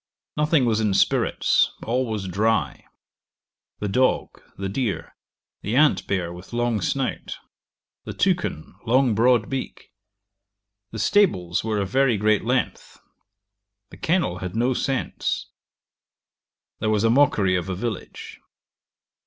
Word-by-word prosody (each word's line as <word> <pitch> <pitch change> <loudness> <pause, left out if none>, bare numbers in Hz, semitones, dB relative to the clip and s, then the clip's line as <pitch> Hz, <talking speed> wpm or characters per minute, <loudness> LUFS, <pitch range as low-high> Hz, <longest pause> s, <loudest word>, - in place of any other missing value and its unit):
Nothing 150 -2 +2
was 110 -2 +1
in 105 -3 +1
spirits; - - +2
all 125 +2 0
was 105 -4 -3
dry. 110 +5 0 0.9
The 105 - -3
dog, 130 +6 0 0.2
the 100 - -3
deer; 105 +1 -3 0.5
the 105 +4 -2
ant 150 +2 +3
bear 90 -3 -2
with 90 +6 -12
long 120 -3 0
snout. 135 +6 -2 0.7
The - - -5
toucan, 180 - -1
long 125 0 +3
broad 115 0 +3
beak. 135 -1 -6 1.0
The 110 - -8
stables 100 - +2
were 110 -1 -1
of 100 -2 -1
very 135 -3 +3
great 105 0 +2
length. 125 +3 -2 0.9
The - - -12
kennel 165 - 0
had 95 +1 -6
no 120 +3 +2
scents. 130 +1 -2 1.3
There 110 - 0
was 105 -1 +1
a 115 - +4
mockery 110 -8 +3
of 90 +1 -2
a 95 - -2
village. 110 +1 -6
110 Hz, 130 wpm, -23 LUFS, 100-130 Hz, 1.3 s, a